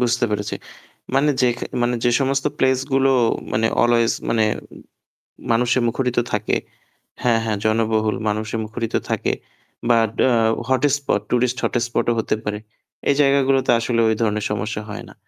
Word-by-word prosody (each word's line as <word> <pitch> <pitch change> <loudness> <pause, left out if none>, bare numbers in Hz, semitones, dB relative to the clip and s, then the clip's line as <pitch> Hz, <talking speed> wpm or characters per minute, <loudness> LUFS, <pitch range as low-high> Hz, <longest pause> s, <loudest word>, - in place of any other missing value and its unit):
বুঝতে 120 0 +1
পেরেছি। 105 0 -2 0.6
মানে 145 +2 +3
যেখ 120 -1 +2 0.3
মানে 120 +1 +1
যে 120 - +4
সমস্ত 135 +1 0
প্লেস 130 -1 +3 0.2
গুলো 135 0 +4 0.4
মানে 110 +1 +2 0.2
always 120 -1 +3 0.2
মানে 115 -1 +2 1.1
মানুষে 120 +2 +2
মুখরিত 125 +1 -1 0.2
থাকে। 105 0 0 0.7
হ্যাঁ, 115 -2 +3
হ্যাঁ 110 -2 -1
জনবহুল 110 0 +1
মানুষে 110 +1 -2
মুখরিত 115 +1 -5 0.2
থাকে। - - 0 0.6
But 115 -2 +4 0.2
a - - +3 0.4
hot 130 -1 +1
spot 140 -7 -1
tourist 125 +1 +1
hotspot 120 0 0
ও - - +4
হতে 110 - 0
পারে। 105 0 -2 0.5
এই 140 - +4
জায়গাগুলোতে 135 -2 +3
আসলে 115 0 0
ওই 110 - +2
ধরনের 105 -2 0
সমস্যা 105 +1 -3
হয় 105 - -7
না। - - -14
115 Hz, 150 wpm, -21 LUFS, 110-125 Hz, 1.1 s, যে